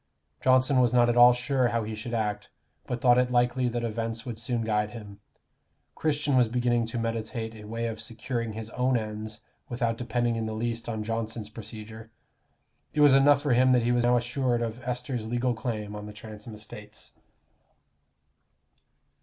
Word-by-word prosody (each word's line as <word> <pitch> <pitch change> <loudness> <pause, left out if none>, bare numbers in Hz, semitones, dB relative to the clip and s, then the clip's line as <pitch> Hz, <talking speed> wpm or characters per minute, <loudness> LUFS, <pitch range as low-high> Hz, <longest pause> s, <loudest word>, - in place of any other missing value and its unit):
Johnson 130 +1 +4
was 125 -2 +3
not 120 -1 +5
at 120 - +2
all 120 0 +9
sure 125 +1 +1
how 115 -1 0
he 110 +1 -5
should 115 +2 -5
act, 105 -2 -2 0.4
but 125 - -2
thought 125 -1 +5
it 125 0 +2
likely 125 +1 +2
that 120 0 -2
events 115 0 -3
would 120 -3 -5
soon 120 -1 -1
guide 105 -1 0
him. 105 -3 -10 0.7
Christian 150 -2 0
was 125 -2 +5
beginning 120 0 +1
to 115 - -4
meditate 115 0 -3
a 105 -1 -11
way 115 +2 -3
of 110 -1 -3
securing 115 0 -3
his 110 0 -7
own 125 0 +1
ends 110 0 -5 0.3
without 120 -2 -1
depending 120 -1 0
in 110 -1 -2
the 110 - -4
least 115 +1 -3
on 110 -2 -3
Johnson's 110 -1 -3
procedure. 110 0 -9 0.9
It 150 - +3
was 145 -2 +7
enough 140 +1 +5
for 145 -4 +2
him 130 +1 +5
that 125 -2 +3
he 120 - +2
was 120 0 +2
now 120 0 +4
assured 120 0 0
of 115 +2 -4
Esther's 125 -2 -3
legal 120 +2 0
claim 110 -3 -4
on 105 0 -7
the 105 - -9
Transome 110 +1 -10
estates. 105 -1 -9
115 Hz, 180 wpm, -27 LUFS, 110-125 Hz, 0.9 s, all